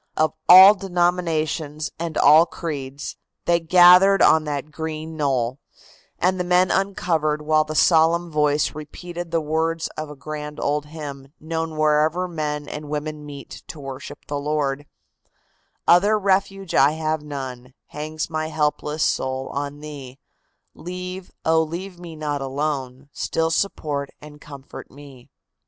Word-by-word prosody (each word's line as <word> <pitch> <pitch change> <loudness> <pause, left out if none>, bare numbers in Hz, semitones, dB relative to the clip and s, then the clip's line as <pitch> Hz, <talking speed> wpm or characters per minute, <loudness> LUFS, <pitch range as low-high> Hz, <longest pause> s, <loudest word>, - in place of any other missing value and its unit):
Of 155 0 +2 0.2
all 190 +3 +11
denominations 175 -5 -1
and 165 -2 -4
all 155 +4 +6
creeds, 140 -4 -6 0.3
they 170 0 +3
gathered 180 +3 +6
on 160 0 +5
that 145 0 -4
green 160 0 -5
knoll, 130 -4 -1 0.6
and 185 +1 +1
the - - +1
men 180 +1 +3
uncovered 165 -6 0
while 155 0 +2
the 155 0 -6
solemn 165 +2 +3
voice 150 -1 +1
repeated 175 +3 -8
the 165 - +1
words 160 +1 -1
of 155 -1 -7
a 150 - -9
grand 150 +1 -7
old 150 +1 -1
hymn, 145 -3 -9
known 160 0 -4
wherever 155 +4 +2
men 150 -3 -4
and 150 -1 -7
women 150 0 -4
meet 140 -2 -10
to 160 - -9
worship 135 -1 -9
the 145 0 -3
Lord: 145 -1 -2 1.0
"Other 200 +5 +5
refuge 195 -1 0
have 155 +2 +2
I - - -16
none, 130 -3 -7
hangs 155 +1 -5
my 155 -1 -3
helpless 150 0 -1
soul 130 0 -1
on 145 +1 -5
Thee; 140 -4 -9 0.6
Leave, 180 +1 -7 0.2
oh, 160 0 +4
leave 175 +3 -6
me 170 -2 -9
not 150 -2 -3
alone, 135 -1 -3
still 165 0 -1
support 150 -6 -2
and 150 0 -13
comfort 140 -1 -11
me!" 135 -3 -15
155 Hz, 140 wpm, -22 LUFS, 145-170 Hz, 1.0 s, all